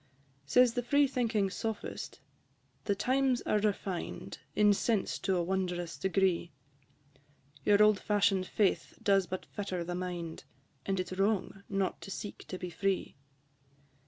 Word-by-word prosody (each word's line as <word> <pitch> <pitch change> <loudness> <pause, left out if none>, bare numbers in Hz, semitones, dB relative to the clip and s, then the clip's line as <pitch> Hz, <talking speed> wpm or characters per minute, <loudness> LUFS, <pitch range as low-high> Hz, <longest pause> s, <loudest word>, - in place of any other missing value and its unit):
II. 135 0 -35
Says 250 - +5
the 245 - 0
free 285 +4 +4
thinking 230 -7 0
Sophist, 220 +1 -5 0.6
"The 200 - +1
times 260 +3 +1
are 210 - +2
refined 200 -3 -3 0.2
In 210 -1 +5
sense 210 0 0
to 190 - 0
a 175 - +1
wondrous 175 -2 -2
degree; 190 -3 +1 1.1
Your 205 0 +6
old 210 -2 +5
fashion'd 195 -3 +2
faith 205 -3 0
does 195 -2 +3
but 185 +2 -5
fetter 190 -4 -4
the 175 +1 -4
mind, 175 -2 -4 0.4
And 195 -1 0
it 180 -1 -2
's 185 - -6
wrong 195 -1 0
not 195 -1 -1
to - - -8
seek 205 +1 -7
to 185 - -5
be 180 -1 -6
free." 195 +3 -1
195 Hz, 150 wpm, -32 LUFS, 180-210 Hz, 1.1 s, Your